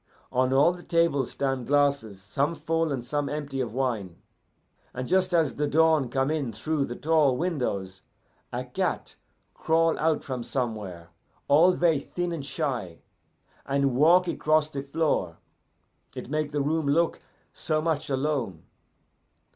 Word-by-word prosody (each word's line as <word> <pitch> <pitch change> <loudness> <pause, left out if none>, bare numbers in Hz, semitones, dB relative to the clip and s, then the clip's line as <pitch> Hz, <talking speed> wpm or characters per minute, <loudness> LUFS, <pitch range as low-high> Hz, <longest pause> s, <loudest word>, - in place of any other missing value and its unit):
On 130 +1 +1
all 140 +6 +4
the 175 - -11
tables 165 -7 +1
stand 135 -3 -2
glasses, 140 -8 +1
some 140 - -1
full, 165 -1 -1
and 125 -3 -3
some 145 +1 -2
empty 145 -2 -3
of 120 -4 -3
wine. 115 -8 -2 0.8
And 125 0 -4
just 185 0 +2
as 165 -5 +2
the 150 0 0
dawn 155 -3 +3
come 135 +3 0
in 145 -6 -1
through 145 +6 -1
the 120 - -6
tall 150 -4 +2
windows, 100 - -2 0.5
a - - -3
cat - - -2 0.4
crawl 165 0 +1
out 160 -1 +1
from 130 -3 -4
somewhere, 105 -10 -4 0.4
all 165 +6 +6
ver' 170 -5 +2
thin 175 +4 -4
and 165 -4 -4
shy, 125 - -3 0.7
and 140 -2 0
walk 170 +6 +5
across 155 -2 +1
the 140 - -4
floor; 140 - -1 0.8
it - - -7
make 155 -1 0
the 145 -1 0
room 155 +1 0
look 165 +4 +1 0.3
so 155 -1 -1
much 155 -2 -1
alone. 130 - -1
145 Hz, 145 wpm, -26 LUFS, 125-160 Hz, 0.8 s, all